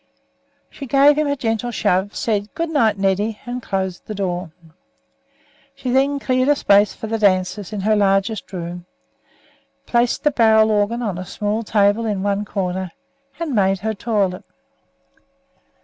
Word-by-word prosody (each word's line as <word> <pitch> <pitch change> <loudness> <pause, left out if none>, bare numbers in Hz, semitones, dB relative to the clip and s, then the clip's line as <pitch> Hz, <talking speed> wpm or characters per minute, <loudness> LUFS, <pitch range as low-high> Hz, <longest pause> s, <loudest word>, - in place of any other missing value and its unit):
She 275 - -8
gave 280 +3 +5
him 305 0 0
a 285 - 0
gentle 235 -3 -2
shove, 205 -3 0
said 210 -2 -1
"Good 330 -1 -2
night, 225 -9 +2
Neddy," 200 +3 0
and 245 +1 -5
closed 190 -4 -4
the 215 - -5
door. 180 -3 -3 1.3
She 265 -2 -4
then 275 +2 +2
cleared 255 0 +1
a 290 - +5
space 205 -5 +3
for - - -7
the 225 +1 -2
dancers 190 0 +1
in 210 -2 -4
her 215 +2 +2
largest 200 +2 +1
room, 175 -1 -6 1.0
placed 240 0 +1
the 300 - +3
barrel 220 -3 +4
organ 215 +3 0
on 195 -5 -3
a - - -4
small 210 +2 -2
table 210 +1 +2
in 200 -3 -2
one 205 0 -1
corner, 185 -2 -3 0.5
and 330 -4 -3
made 195 -3 +2
her 220 +1 -1
toilet. 200 -4 -1
210 Hz, 155 wpm, -20 LUFS, 195-240 Hz, 1.3 s, gave